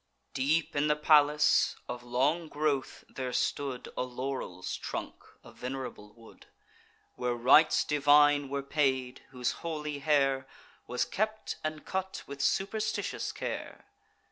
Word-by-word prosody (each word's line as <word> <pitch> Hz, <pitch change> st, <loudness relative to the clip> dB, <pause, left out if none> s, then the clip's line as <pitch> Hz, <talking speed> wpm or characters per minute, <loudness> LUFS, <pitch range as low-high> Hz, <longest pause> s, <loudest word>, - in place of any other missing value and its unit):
Deep 150 Hz, +5 st, +1 dB
in 145 Hz, +1 st, +2 dB
the 150 Hz, -, +3 dB
palace, 150 Hz, 0 st, +4 dB
of 125 Hz, 0 st, -5 dB
long 135 Hz, +8 st, 0 dB
growth, 145 Hz, -3 st, -1 dB
there 130 Hz, -1 st, -5 dB
stood 135 Hz, 0 st, -2 dB
A -, -, -1 dB
laurel's 125 Hz, -7 st, -4 dB
trunk, -, -, -5 dB, 0.3 s
a -, -, -13 dB
venerable 125 Hz, -5 st, -6 dB
wood; 115 Hz, -1 st, -17 dB, 0.7 s
Where 125 Hz, -1 st, -2 dB
rites 130 Hz, +7 st, +5 dB
divine 145 Hz, -1 st, +4 dB
were 140 Hz, 0 st, -2 dB
paid; 130 Hz, -3 st, 0 dB
whose 125 Hz, -2 st, -1 dB
holy 150 Hz, -3 st, -4 dB
hair 135 Hz, -3 st, +2 dB, 0.4 s
Was 125 Hz, -, 0 dB
kept 215 Hz, +1 st, -2 dB
and 155 Hz, -1 st, -4 dB
cut 190 Hz, 0 st, -3 dB
with 140 Hz, 0 st, -7 dB
superstitious 200 Hz, +7 st, -1 dB
care. -, -, -6 dB
140 Hz, 125 wpm, -30 LUFS, 130-150 Hz, 0.7 s, rites